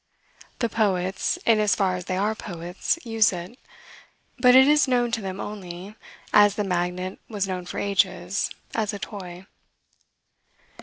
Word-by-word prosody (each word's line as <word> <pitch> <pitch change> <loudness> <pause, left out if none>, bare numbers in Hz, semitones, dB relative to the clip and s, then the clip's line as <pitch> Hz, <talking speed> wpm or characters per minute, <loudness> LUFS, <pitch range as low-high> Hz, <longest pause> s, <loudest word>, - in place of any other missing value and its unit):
The 235 - 0
poets, 190 -4 0
in 225 -2 +4
as 210 -3 +3
far 185 -1 +1
as 180 -1 -6
they 185 -1 -2
are 210 +3 +1
poets, 175 - -3
use 225 -3 +3
it; 180 +7 -8 0.8
but 250 0 +6
it 265 +1 +8
is 295 0 +4
known 245 -2 +1
to 230 -1 -1
them 190 0 -5
only, 190 -1 -7 0.4
as 205 -1 +6
the 210 - -1
magnet 180 0 -2
was 205 -3 -2
known 180 -1 -4
for - - -6
ages, 190 -1 0 0.2
as 215 -2 -1
a - - -4
toy. 185 -3 -8
200 Hz, 155 wpm, -25 LUFS, 180-220 Hz, 0.8 s, it